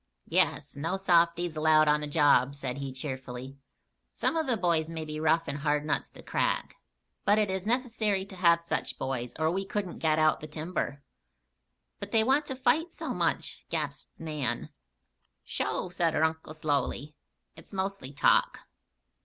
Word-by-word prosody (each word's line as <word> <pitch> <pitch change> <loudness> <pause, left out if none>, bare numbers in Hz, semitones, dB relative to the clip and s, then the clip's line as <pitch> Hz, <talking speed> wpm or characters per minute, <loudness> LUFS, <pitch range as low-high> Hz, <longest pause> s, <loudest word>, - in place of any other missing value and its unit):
"Yes. - - +1
No 165 +7 -2
softies 170 -2 +3
allowed 155 0 +5
on 150 0 +3
the 150 - -3
job," 145 -3 +4
said 135 -1 -4
he, 135 -1 -4
cheerfully. 130 0 -6 0.6
"Some - - +1
of 320 -3 0
the 245 -3 +2
boys 170 -4 +1
may 160 -1 -5
be 155 0 -5
rough 160 +1 +2
and 140 - -3
hard 150 0 +1
nuts 155 - -1
to - - -13
crack; - - -1 0.5
but 205 +1 +4
it 210 -3 +2
is 190 +1 -3
necessary 225 -5 +1
to 195 - -11
have 170 -2 +5
just 170 - -20
such - - -2
boys 125 -2 -3
or 160 +1 +2
we 190 +2 -1
couldn't 195 -2 -4
get 155 -1 +2
out 155 0 +3
the 155 - -8
timber." 155 -2 -4 1.0
"But 200 0 -7
they 220 -1 +4
want 275 +5 +2
to 265 - -3
fight 270 +7 +1
so - - -4
much!" - - -1
gasped - - -4
Nan. 150 -5 -3 0.7
"Sho!" 185 - -2
said 170 -2 0
her 155 - +2
uncle, 160 -1 -1
slowly. 145 -1 -1 0.4
"It's 160 - -13
mostly 190 -8 -3
talk. 140 - +3
160 Hz, 170 wpm, -29 LUFS, 150-190 Hz, 1.0 s, allowed